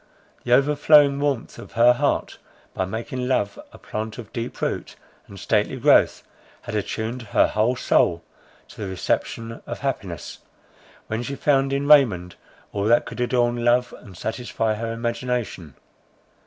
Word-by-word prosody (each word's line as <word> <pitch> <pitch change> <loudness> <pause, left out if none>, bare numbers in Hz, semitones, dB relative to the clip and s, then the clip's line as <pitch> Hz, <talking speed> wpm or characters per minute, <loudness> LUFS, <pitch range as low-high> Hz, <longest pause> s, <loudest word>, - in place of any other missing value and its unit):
The 120 - +1
overflowing 145 +1 +5
warmth 140 -5 -2
of - - -12
her 120 +1 +6
heart, 120 - -1 0.3
by 95 - -1
making 120 +5 -4
love 105 -6 0
a - - -13
plant 110 0 -6
of 115 -4 -10
deep 120 +1 -5
root - - -3 0.3
and 100 - -11
stately 105 +2 0
growth, - - +4 0.4
had 120 - -7
attuned 110 +3 -3
her 110 - +2
whole 110 +4 +1
soul 85 -7 +2 0.5
to - - -11
the 100 - -3
reception 115 +4 -3
of - - -6
happiness, - - -4 0.7
when 110 +1 -3
she 135 +3 -4
found 135 -1 +2
in 140 +1 -1
Raymond 105 -13 +5 0.4
all 100 -1 -2
that 120 +2 +4
could - - -8
adorn 120 -1 +1
love 125 +1 +2
and 95 -4 -14
satisfy 110 0 -2
her 115 +2 -4
imagination. 115 - -3
120 Hz, 150 wpm, -23 LUFS, 110-125 Hz, 0.7 s, her